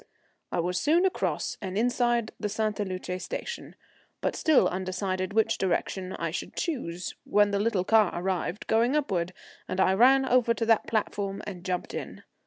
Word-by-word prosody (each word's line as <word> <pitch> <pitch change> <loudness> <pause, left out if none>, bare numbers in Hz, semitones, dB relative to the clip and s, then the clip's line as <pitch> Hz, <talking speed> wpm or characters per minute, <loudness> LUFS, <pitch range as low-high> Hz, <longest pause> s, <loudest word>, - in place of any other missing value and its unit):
I - - -1
was 180 +2 0
soon 335 +5 +3
across 375 - -1
and 190 -1 -4
inside 240 -1 +1
the 210 - -2
Sainte 215 0 -1
Luce 185 -2 -3
station, 475 - -6 0.4
but - - -1
still 315 -3 +4
undecided 185 +1 -2
which 220 +1 +2
direction 185 0 -1
I - - -3
should - - -5
choose, 180 - -3
when 205 0 +3
the 200 - +1
little 205 -3 +1
car 215 -1 +4
arrived 185 +1 -2
going 235 +5 +2
upward, 185 - 0 0.4
and 185 - -3
I 190 0 +4
ran 265 +6 +5
over 245 -2 +3
to 230 - -1
that 225 -1 +3
platform 205 -2 -2
and 185 -4 -7
jumped 180 -1 -3
in. - - -6
205 Hz, 170 wpm, -28 LUFS, 185-235 Hz, 0.4 s, ran